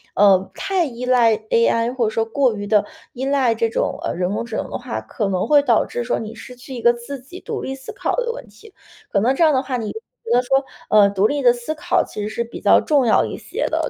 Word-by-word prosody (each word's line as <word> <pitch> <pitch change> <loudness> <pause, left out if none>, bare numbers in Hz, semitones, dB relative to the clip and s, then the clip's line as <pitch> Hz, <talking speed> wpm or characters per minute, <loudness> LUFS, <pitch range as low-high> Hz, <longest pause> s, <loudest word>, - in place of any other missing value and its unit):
呃， 195 -2 +4
太 390 -2 0
依 250 -4 -5
赖 240 -3 +4 0.2
AI 230 +1 +2
或 245 -3 0
者 - - +1
说 225 +1 -1
过 250 +1 +1
于 205 -1 -5
的 210 -1 +3 0.3
依 255 +1 -6
赖 270 -4 +2
这 230 0 0
种， - - -1
呃 - - -2
人 180 +3 -1
工 - - -2
智 230 -2 -5
能 - - -4
的 - - -4
话， 110 - -5
可 195 - -3
能 185 -1 -1
会 295 -1 +6
导 235 -6 +2
致 240 - -4
说 245 - -1
你 220 0 -7
失 250 - -11
去 260 +1 -9
一 235 - -6
个 235 - +6
自 245 +3 -8
己 350 +8 -11
独 - - -5
立 265 - -4
思 265 -1 -10
考 - - -2
的 - - +1
一 - - -5
个 470 - -2
问 - - -9
题。 445 - -17 0.4
可 200 - +1
能 250 +4 +3
这 270 - -4
样 315 -3 +5
的 260 - +1
话， 255 -2 -2
你 220 -2 -4
觉 445 - -6 0.4
得 - - +4
说 270 +2 +2 0.3
呃 205 -2 +6
独 200 +1 +2
立 290 0 -1
的 245 -2 +6
思 240 +6 -5
考 300 - +1
其 210 - -7
实 210 - -3
是 235 +2 -2
比 235 - -10
较 - - +5
重 285 -5 +2
要 220 - +4
一 - - -6
些 - - -3
的， - - -1
240 Hz, 305 characters per minute, -20 LUFS, 220-270 Hz, 0.4 s, 会